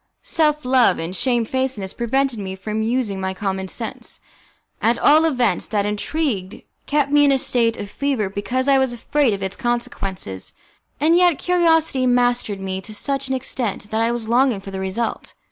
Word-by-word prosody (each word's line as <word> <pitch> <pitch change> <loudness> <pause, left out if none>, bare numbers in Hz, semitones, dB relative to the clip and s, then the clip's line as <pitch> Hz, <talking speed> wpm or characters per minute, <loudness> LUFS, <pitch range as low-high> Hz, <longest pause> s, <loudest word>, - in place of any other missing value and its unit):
Self 300 -3 +1
love 250 -7 +4
and 165 +3 -4
shamefacedness 240 -2 -1
prevented 255 0 0
me 190 -1 -5
from 215 +3 -4
using 220 -4 -1
my 190 0 -2
common 190 -1 -3
sense. 225 +4 -6 0.6
At 235 +1 +2
all 310 +2 +5
events, 245 - +1
that 205 -2 0
intrigue 210 - -2 0.2
kept 285 -1 +1
me 290 0 +5
in 285 - +5
a 270 - +4
state 235 -3 +1
of 205 - -5
fever 275 -7 -1
because 245 +7 -2
I 275 -1 +5
was 265 -2 +1
afraid 275 +2 +1
of 195 -1 -3
its 190 +1 -3
consequences, 195 - -4 0.5
and 320 +3 +4
yet 350 -4 +4
curiosity 325 -7 +2
mastered 245 -4 +1
me 190 0 -3
to 215 +2 -6
such 275 +4 -2
an 265 - -1
extent 235 -5 -3
that 220 +1 +1
I 230 +1 +2
was 235 -2 -3
longing 245 -2 +3
for 195 0 -9
the 190 - -5
result. 190 +5 -3
240 Hz, 180 wpm, -21 LUFS, 200-270 Hz, 0.6 s, all